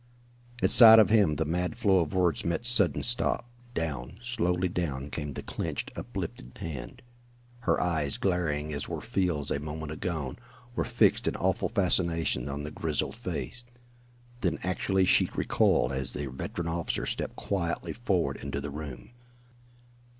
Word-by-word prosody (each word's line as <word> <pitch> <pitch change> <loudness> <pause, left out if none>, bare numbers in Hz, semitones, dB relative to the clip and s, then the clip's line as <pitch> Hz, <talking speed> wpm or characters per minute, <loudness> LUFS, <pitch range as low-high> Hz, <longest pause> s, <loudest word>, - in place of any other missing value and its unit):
At - - +6
sight 115 -2 +11
of 110 -1 +6
him 100 -9 +4
the 80 +2 -1
mad 90 +5 -2
flow 100 -5 +3
of 80 -4 -1
words 90 -5 +1
met 85 +8 -2
sudden 120 -4 +3
stop. 120 0 +1 0.3
Down, 75 -1 -3
slowly 95 -7 0
down, 75 -6 -3
came 75 -2 -4
the - - -6
clinched, - - -4
uplifted 65 +1 -6
hand. 65 -7 -7 0.6
Her 125 - +1
eyes, 80 -6 0
glaring 75 -5 -1
as 70 - -4
were - - -3
Field's 85 -7 -1
a - - 0
moment 75 +1 -6
agone, 75 -5 -4 0.4
were - - 0
fixed - - +2
in - - 0
awful - - 0
fascination 85 -6 +1
on 70 +1 -4
the 75 - -6
grizzled 75 -1 -2
face. 125 - -4 0.8
Then 90 -8 0
actually 95 +1 +1
she - - +4
recoiled 65 - +2
as 65 -1 +1
the 75 - -3
veteran 85 +6 -5
officer 85 0 -2
stepped - - -3
quietly 85 -4 -3
forward 90 - -1
into 70 0 -4
the 70 0 -5
room. 70 - -8
85 Hz, 155 wpm, -28 LUFS, 75-95 Hz, 0.8 s, sight